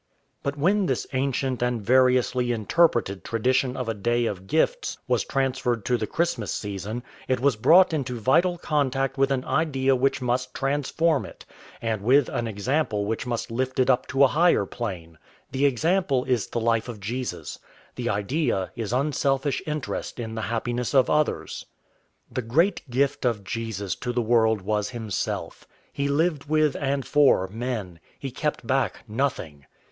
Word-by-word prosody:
But 140 Hz, +1 st, -3 dB
when 190 Hz, +6 st, +2 dB
this -, -, -1 dB
ancient 130 Hz, -1 st, -1 dB
and 125 Hz, -1 st, 0 dB
variously 125 Hz, +1 st, +3 dB
interpreted 115 Hz, -, +1 dB
tradition 125 Hz, +3 st, 0 dB
of 125 Hz, -2 st, -3 dB
a 115 Hz, -, 0 dB
day 120 Hz, +3 st, 0 dB
of 95 Hz, -4 st, -4 dB
gifts 325 Hz, -, 0 dB
was -, -, +2 dB
transferred 130 Hz, -5 st, -1 dB
to 125 Hz, -, +2 dB
the 110 Hz, -3 st, -2 dB
Christmas 145 Hz, -, -1 dB
season, 105 Hz, +4 st, -4 dB, 0.2 s
it 130 Hz, -1 st, +1 dB
was 135 Hz, -1 st, +2 dB
brought 170 Hz, -, +5 dB
into 130 Hz, -5 st, -2 dB
vital 175 Hz, -, +3 dB
contact 135 Hz, -4 st, 0 dB
with 135 Hz, 0 st, +4 dB
an 135 Hz, -1 st, -1 dB
idea 135 Hz, -4 st, +1 dB
which 135 Hz, +2 st, +1 dB
must 125 Hz, 0 st, -1 dB
transform 145 Hz, +3 st, +1 dB
it, -, -, -11 dB, 0.4 s
and 110 Hz, -3 st, -1 dB
with 130 Hz, +5 st, +4 dB
an 120 Hz, -, -2 dB
example 110 Hz, 0 st, -1 dB
which 110 Hz, +3 st, -3 dB
must 120 Hz, -1 st, -3 dB
lift 130 Hz, +2 st, -2 dB
it 130 Hz, +1 st, +4 dB
up 125 Hz, -, 0 dB
to 135 Hz, +1 st, +3 dB
a -, -, +8 dB
higher 165 Hz, -, +3 dB
plane. 90 Hz, -9 st, -6 dB, 0.3 s
The 140 Hz, +2 st, +3 dB
example 140 Hz, 0 st, +1 dB
is 120 Hz, -7 st, 0 dB
the -, -, -3 dB
life 115 Hz, +1 st, +1 dB
of 115 Hz, -3 st, -7 dB
Jesus. 120 Hz, +6 st, -5 dB, 0.3 s
The 120 Hz, -1 st, -3 dB
idea 105 Hz, -, -1 dB
is 115 Hz, -3 st, -4 dB
unselfish 135 Hz, 0 st, 0 dB
interest 150 Hz, -4 st, -4 dB
in 110 Hz, -2 st, -4 dB
the 110 Hz, -, -3 dB
happiness 120 Hz, +3 st, -2 dB
of 130 Hz, -2 st, +4 dB
others. 150 Hz, 0 st, -1 dB, 0.6 s
The 130 Hz, -, -2 dB
great 150 Hz, -, +1 dB
gift 140 Hz, +3 st, 0 dB
of 115 Hz, -5 st, 0 dB
Jesus 105 Hz, -2 st, -3 dB
to 125 Hz, -, -3 dB
the 120 Hz, -, -1 dB
world 110 Hz, -3 st, +2 dB
was 105 Hz, 0 st, -1 dB
himself. 110 Hz, -6 st, -4 dB, 0.3 s
He 140 Hz, 0 st, -1 dB
lived 150 Hz, +1 st, +1 dB
with 155 Hz, -1 st, +2 dB
and 140 Hz, -1 st, -1 dB
for 145 Hz, -10 st, +4 dB
men. 110 Hz, -6 st, -4 dB, 0.2 s
He 135 Hz, -, -6 dB
kept 145 Hz, 0 st, -3 dB
back 135 Hz, +3 st, 0 dB
nothing. 105 Hz, -, -3 dB
125 Hz, 165 wpm, -25 LUFS, 115-140 Hz, 0.6 s, a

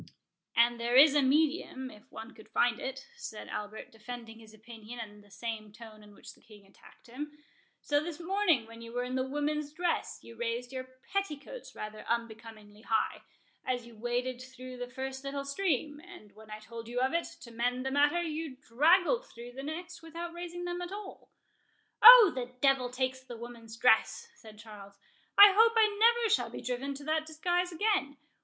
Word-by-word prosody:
"And 235 Hz, 0 st, +4 dB
there 235 Hz, +1 st, 0 dB
is 280 Hz, +2 st, +8 dB
a 295 Hz, -, +4 dB
medium, 275 Hz, -2 st, +1 dB
if 210 Hz, +1 st, -18 dB
one 225 Hz, +3 st, -9 dB
could 220 Hz, -, -16 dB
find 240 Hz, 0 st, +2 dB
it," 270 Hz, +1 st, -6 dB
said 475 Hz, -, -8 dB
Albert, 210 Hz, +1 st, -6 dB
defending 225 Hz, 0 st, -9 dB
his 220 Hz, -1 st, -15 dB
opinion 225 Hz, +1 st, -11 dB
in 210 Hz, -2 st, -9 dB
the 205 Hz, -, -21 dB
same 215 Hz, +1 st, -6 dB
tone 215 Hz, 0 st, -13 dB
in 205 Hz, -1 st, -16 dB
which -, -, -12 dB
the -, -, -24 dB
King 210 Hz, -2 st, -17 dB
attacked 195 Hz, -, -20 dB
him; 295 Hz, +5 st, -8 dB, 0.5 s
"so 290 Hz, 0 st, +2 dB
this 340 Hz, -1 st, -6 dB
morning, 345 Hz, -, +1 dB
when 230 Hz, +1 st, -12 dB
you 230 Hz, 0 st, -10 dB
were 245 Hz, 0 st, -1 dB
in 250 Hz, 0 st, -5 dB
the 260 Hz, 0 st, -1 dB
woman's 295 Hz, +1 st, -2 dB
dress, 345 Hz, +2 st, -2 dB
you 230 Hz, -, -12 dB
raised 235 Hz, +2 st, -3 dB
your 260 Hz, -1 st, -6 dB, 0.3 s
petticoats 395 Hz, -, -4 dB
rather 215 Hz, 0 st, -7 dB
unbecomingly 225 Hz, -2 st, -5 dB
high, 220 Hz, 0 st, 0 dB, 0.4 s
as 250 Hz, -2 st, -2 dB
you 235 Hz, -1 st, -14 dB
waded 245 Hz, +2 st, -2 dB
through 255 Hz, 0 st, -10 dB
the 245 Hz, 0 st, -5 dB
first 265 Hz, +1 st, -6 dB
little 275 Hz, 0 st, -4 dB
stream; 295 Hz, -2 st, -1 dB
and 350 Hz, -, -14 dB
when 220 Hz, 0 st, -16 dB
I 215 Hz, -, -6 dB
told 230 Hz, +1 st, -10 dB
you 245 Hz, +1 st, -3 dB
of 260 Hz, +4 st, +1 dB
it, 335 Hz, 0 st, 0 dB
to 235 Hz, -1 st, -11 dB
mend 245 Hz, +2 st, -1 dB
the 265 Hz, -, -1 dB
matter, 290 Hz, +5 st, +3 dB
you 315 Hz, -3 st, -4 dB
draggled 345 Hz, -, +2 dB
through 240 Hz, -, -11 dB
the 265 Hz, +2 st, -8 dB
next 335 Hz, +4 st, -7 dB
without 335 Hz, +1 st, -7 dB
raising 350 Hz, 0 st, -6 dB
them 350 Hz, 0 st, -4 dB
at 355 Hz, +1 st, -6 dB
all." 405 Hz, -1 st, -9 dB, 0.7 s
"O, 460 Hz, -4 st, +11 dB
the 250 Hz, -1 st, -6 dB
devil 270 Hz, -2 st, +3 dB
take 260 Hz, +1 st, -3 dB
the 240 Hz, -2 st, -8 dB
woman's 230 Hz, -1 st, -10 dB
dress!" 230 Hz, -2 st, +3 dB
said 220 Hz, -3 st, -15 dB
Charles; 205 Hz, -2 st, -12 dB, 0.4 s
"I 405 Hz, -1 st, +10 dB
hope 455 Hz, +2 st, +6 dB
I 450 Hz, +2 st, +4 dB
shall -, -, +3 dB
never -, -, -9 dB
be -, -, -8 dB
driven 260 Hz, +3 st, -3 dB
to 285 Hz, -, -9 dB
that 310 Hz, +1 st, -1 dB
disguise 350 Hz, +3 st, -1 dB
again. 340 Hz, -6 st, 0 dB
255 Hz, 190 wpm, -31 LUFS, 230-315 Hz, 0.7 s, O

